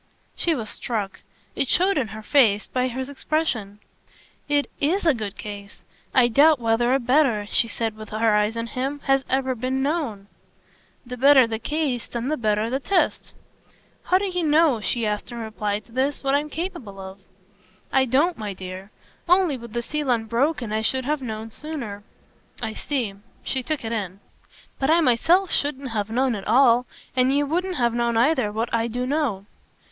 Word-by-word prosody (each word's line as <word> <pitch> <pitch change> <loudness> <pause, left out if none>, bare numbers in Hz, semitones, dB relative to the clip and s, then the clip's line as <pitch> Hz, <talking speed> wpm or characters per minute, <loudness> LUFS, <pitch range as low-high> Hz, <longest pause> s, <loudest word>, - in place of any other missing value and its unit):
She 335 -2 +1
was 220 -5 -4
struck 210 -5 -4 0.4
it 275 - 0
showed 375 +7 +3
in 265 -7 0
her 215 +1 -9
face 215 -6 +3
by 255 0 0
his 255 +1 -4
expression. 275 -8 -2 0.7
"It 290 -1 +2
IS 345 +7 +1
a 320 - +5
good 210 -5 -5
case. 205 -1 -9 0.3
I 255 -2 +5
doubt 290 +6 +5
whether 230 +1 +2
a - - +2
better," 250 -4 +2
she 230 +3 +2
said 225 -1 -3
with 215 -1 -10
her 220 0 +2
eyes 210 +2 +1
on 230 - -2
him, 265 +5 -3
"has 270 0 +2
ever 265 0 +1
been 255 +2 -2
known." 275 -10 -2 0.8
"The 250 +1 -7
better 270 0 +7
the 225 -1 -4
case 285 -2 -2
then 240 +2 -4
the 310 - +1
better 215 -1 +1
the 260 +3 -1
test!" 365 +6 0 0.7
"How 370 - +4
do 395 - -1
you 360 -2 -1
know," 300 -6 +3
she 225 +4 -1
asked 210 +2 -3
in 240 - -7
reply 215 -2 -2
to 230 - -23
this, 270 +4 -1
"what 270 0 +1
I'm 295 +2 +1
capable 275 - -6
of?" 190 +1 -9 0.7
"I 265 0 +4
don't, 280 +7 +2
my 210 -2 -4
dear! 185 +1 -8 0.4
Only 360 -5 +4
with 235 -3 -10
the 235 0 -2
seal 300 +1 -3
unbroken 235 +2 0
I 220 - 0
should 260 +3 0
have 300 0 -1
known 220 -2 -5
sooner." 240 -9 -6 0.6
"I 220 -2 -3
see" 245 -8 -2 0.3
she 265 - -1
took 295 -1 -3
it 225 - -3
in. 195 -4 -3 0.6
"But 270 - 0
I 330 +2 +5
myself 335 +8 +3
shouldn't 280 -3 -1
have 210 -1 -2
known 255 +2 +1
at 200 -3 -6
all. 245 +1 +5 0.3
And 255 0 +3
you 290 - +2
wouldn't 360 +5 -1
have 240 -3 +1
known, 235 -1 0
either, 250 -3 +2
what 225 +2 -3
I 230 0 +1
do 245 +2 -3
know." 255 -9 -1
245 Hz, 185 wpm, -23 LUFS, 220-285 Hz, 0.8 s, better